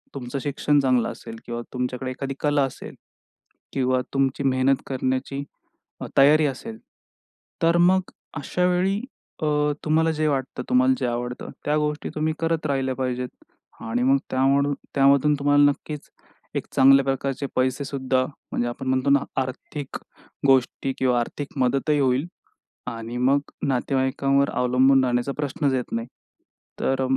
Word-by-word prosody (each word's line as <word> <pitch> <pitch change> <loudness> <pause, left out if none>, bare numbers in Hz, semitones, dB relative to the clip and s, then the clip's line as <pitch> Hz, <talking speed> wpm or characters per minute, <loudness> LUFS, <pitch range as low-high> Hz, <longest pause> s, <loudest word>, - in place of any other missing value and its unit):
तुमचं 135 0 -4
शिक्षण 145 +1 +1
चांगलं 130 -3 +2
असेल 115 - -9
किंवा 120 0 -4
तुमच्याकडे 125 +1 -3
एखादी 135 +1 -4
कला 145 -1 +2
असेल 135 - -8 0.8
किंवा 130 -1 +1
तुमची 135 0 0
मेहनत 130 0 +3
करण्याची 130 +1 -2 0.8
तयारी 150 +3 +6
असेल 130 -5 -4 0.8
तर 165 +1 +4
मग 185 +2 +3 0.3
अशावेळी 180 +6 +1 0.4
अ, - - +2 0.4
तुम्हाला 160 +1 +3
जे 155 0 0
वाटतं 135 -3 -2
तुम्हाला 255 +1 +4
जे - - -1
आवडतं 120 +1 -4 0.2
त्या 150 +1 +2
गोष्टी 150 0 -2
तुम्ही 155 +1 0
करत 165 -1 -1
राहिल्या 135 -2 0
पाहिजेत 125 -1 -2 0.5
आणि 115 +2 -1
मग 135 +2 +4
त्यामुळ 140 +2 +2 0.2
त्यामधून 140 +2 +4
तुम्हाला 145 0 +4
नक्कीच 150 +1 -8 0.5
एक - - -2
चांगल्या 135 0 +6
प्रकारचे 135 +1 -2
पैसे 130 +2 +1
सुद्धा 130 -1 0
म्हणजे 125 -3 -5
आपण 130 +2 -6
म्हणतो 130 +1 +1
ना, 140 0 +5 0.2
आर्थिक 130 +2 -6 0.5
गोष्टी 135 0 +2
किंवा 125 -2 +2
आर्थिक 140 +4 -5
मदतही 135 +3 +1
होईल 130 +2 +2 0.6
आणि 115 +1 -5
मग 130 +3 +3 0.3
नातेवाईकांवर 135 +1 +1
अवलंबून 130 +2 +3
राहण्याचा 125 +2 0
प्रश्नच 145 -1 -1
येत 125 - -3
नाही. 115 0 -2 0.7
तर 135 0 +1
135 Hz, 135 wpm, -24 LUFS, 130-145 Hz, 0.8 s, तयारी